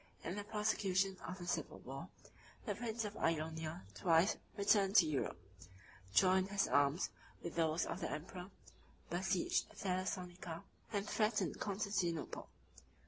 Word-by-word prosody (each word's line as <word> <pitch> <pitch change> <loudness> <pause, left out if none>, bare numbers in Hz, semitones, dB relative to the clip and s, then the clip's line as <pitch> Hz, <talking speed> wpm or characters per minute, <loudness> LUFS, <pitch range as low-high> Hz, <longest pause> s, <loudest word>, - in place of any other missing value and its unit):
In - - -2
the 205 - -3
prosecution 195 -3 +1
of 180 - -4
the 175 - -7
civil - - -1
war, - - -7 0.6
the - - 0
prince 230 -1 -2
of 210 0 -5
Ionia 160 +1 -1
twice 170 +2 +4 0.2
returned 200 -1 +4
to 190 - +9
Europe; 145 - -1 0.7
joined 185 - +5
his 200 0 +2
arms 145 +4 +3 0.3
with 170 - -4
those 165 0 +2
of - - -3
the - - -1
emperor; 180 +4 -5 0.6
besieged 180 +1 +1
Thessalonica, 180 -3 -3 0.3
and 205 -1 -1
threatened 215 0 +1
Constantinople. 195 -5 -1
185 Hz, 130 wpm, -38 LUFS, 165-200 Hz, 0.7 s, to